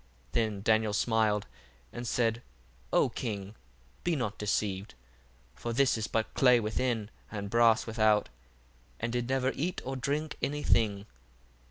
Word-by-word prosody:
1:7 - - -30
Then 110 -4 0
Daniel 110 -1 +3
smiled, 110 -2 +2 0.5
and 120 0 -5
said, 115 -1 +1 0.5
O - - +4
king, 100 -4 -4 0.5
be 175 -2 +1
not 120 -7 -3
deceived: 100 -4 -1 0.6
for 115 - -4
this 135 +1 +3
is 110 -1 -2
but 110 -1 -1
clay 125 -2 +5
within, 110 0 -1 0.2
and 100 -2 -5
brass 115 -1 +4
without, 110 -2 +3 0.7
and 115 +1 -2
did 120 0 -1
never 130 0 +1
eat 170 +6 -2
or 135 +1 -3
drink 145 +4 -2
any 145 +1 -1
thing. 100 -3 +2
115 Hz, 145 wpm, -30 LUFS, 105-125 Hz, 0.7 s, clay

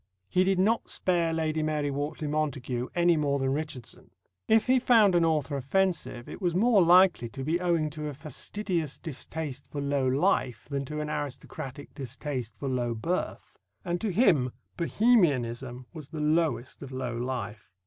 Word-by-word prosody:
He 180 - +3
did 190 0 +2
not 220 +5 +2
spare 170 -3 +1
Lady 160 -1 0
Mary 150 -2 0
Wortley 145 +2 -3
Montagu 135 -5 -2
any 175 -1 +4
more 145 -2 +1
than 135 -1 0
Richardson. 150 -5 -5 0.4
If 220 0 +4
he 255 0 +4
found 225 -6 +5
an 175 -1 +4
author 155 -3 +1
offensive, 155 -3 0
it - - -9
was 175 -2 0
more 215 +1 +5
likely 175 -7 +5
to 135 +3 -6
be 160 +5 0
owing 165 -4 +1
to 150 0 -5
a 145 - -5
fastidious 165 - -2
distaste 145 -3 -6
for 145 - -6
low 140 -2 0
life 130 - +1
than 140 -1 -3
to 150 +3 -4
an 150 - -4
aristocratic 140 -1 -6
distaste 130 -3 -5
for 140 - -4
low 120 -3 -1
birth; 170 +12 -3 0.3
and 175 -1 -2
to 220 - 0
him 170 - +3 0.2
Bohemianism 135 - +2
was 155 -4 -9
the 160 - -6
lowest 150 -5 0
of 135 -2 -8
low 130 -2 -3
life. 120 -5 -4
150 Hz, 170 wpm, -28 LUFS, 130-175 Hz, 0.4 s, found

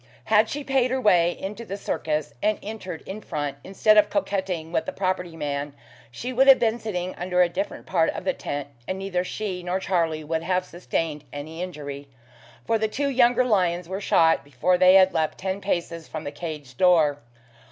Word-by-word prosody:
Had 220 0 +3
she 290 +3 -4
paid 265 -2 +2
her 260 +1 0
way 175 -7 +3
into 210 +4 -5
the 195 -3 -6
circus, 155 -8 -2
and 215 0 +2
entered 195 -6 -7
in 200 +3 -7
front, 145 -6 -4
instead 210 +3 +4
of 210 0 +3
coquetting 190 - -2
with - - -1
the - - -1
property 185 -3 -2
man, 145 -1 -3 0.3
she 240 - -6
would 265 +2 +4
have 270 -1 +10
been 230 0 +1
sitting 185 -5 -3
under 180 0 +2
a - - +3
different 295 - -4
part 165 -3 +2
of - - -5
the - - +1
tent, 145 -1 -4 0.2
and 185 - -2
neither 190 -2 -2
she 185 -1 -4
nor 180 +2 -2
Charlie 165 -5 0
would 160 +1 -2
have 180 +2 0
sustained 165 -4 -3
any 155 +4 -7
injury, 145 -5 -6 0.6
for 225 -1 +1
the 220 - +1
two 280 +6 -1
younger 250 -1 +4
lions 180 -6 +1
were 190 +2 -4
shot 165 -6 +3
before 145 +6 +1
they 185 +1 +6
had 190 -1 +6
leapt 160 -2 0
ten 190 +1 -3
paces 170 -4 -2
from 155 - -6
the 145 - -5
cage 150 -7 -7
door. 160 -6 +4
180 Hz, 195 wpm, -25 LUFS, 160-210 Hz, 0.6 s, have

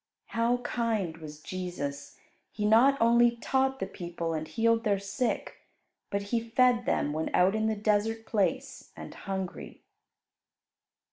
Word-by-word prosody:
How 235 +1 +1
kind 220 -10 -1
was 150 -2 -10
Jesus! 175 -6 -5 0.3
He 210 - -3
not 245 +6 +5
only 235 +1 +4
taught 265 +3 0
the - - -1
people 170 -2 -5
and 155 0 -3
healed 230 +7 +1
their 205 -3 +2
sick, 200 +5 -3 0.5
but 200 0 -2
He 235 - +4
fed 245 0 +3
them 145 - +1
when 160 +1 -2
out 180 +2 +4
in 220 0 0
the 220 - 0
desert 215 +2 0
place 260 +7 -1
and - - -8
hungry. 190 -2 -6
215 Hz, 140 wpm, -29 LUFS, 180-235 Hz, 0.5 s, not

